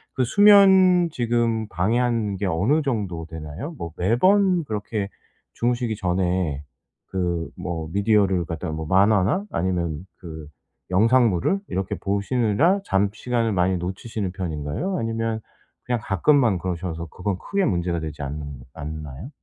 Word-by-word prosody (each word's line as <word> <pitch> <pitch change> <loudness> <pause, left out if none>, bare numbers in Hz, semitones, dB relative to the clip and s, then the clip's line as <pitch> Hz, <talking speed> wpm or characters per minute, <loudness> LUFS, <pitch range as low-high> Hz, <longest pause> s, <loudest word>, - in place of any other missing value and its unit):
그 130 - +2
수면 190 - +6
지금 115 -3 0
방해하는 110 +2 0
게 100 - -2
어느 100 - +2
정도 100 - -2
되나요? 80 - -7
뭐 85 - -6
매번 180 - +3
그렇게 105 -2 -3 0.4
주무시기 120 -1 -1
전에 90 -5 -1 0.4
그 85 -3 -2
뭐 80 -3 -4
미디어를 100 -3 +2
갖다가 80 -1 -4
뭐 80 0 -4
만화나 100 - +3
아니면 85 -3 -2
그 80 -4 -9 0.4
영상물을 115 - +3
이렇게 95 0 -2
보시느라 120 - +1
잠 100 +1 +2
시간을 115 0 -1
많이 90 0 +2
놓치시는 95 +2 -4
편인가요? 85 - -3
아니면 115 0 -2 0.5
그냥 120 -2 0
가끔만 115 - +3
그러셔서 85 -2 -4
그건 90 +3 -3
크게 200 -1 -1
문제가 85 -2 0
되지 75 -2 -6
않는 70 -1 -6
않나요? 75 - -7
100 Hz, 300 characters per minute, -23 LUFS, 85-120 Hz, 0.5 s, 수면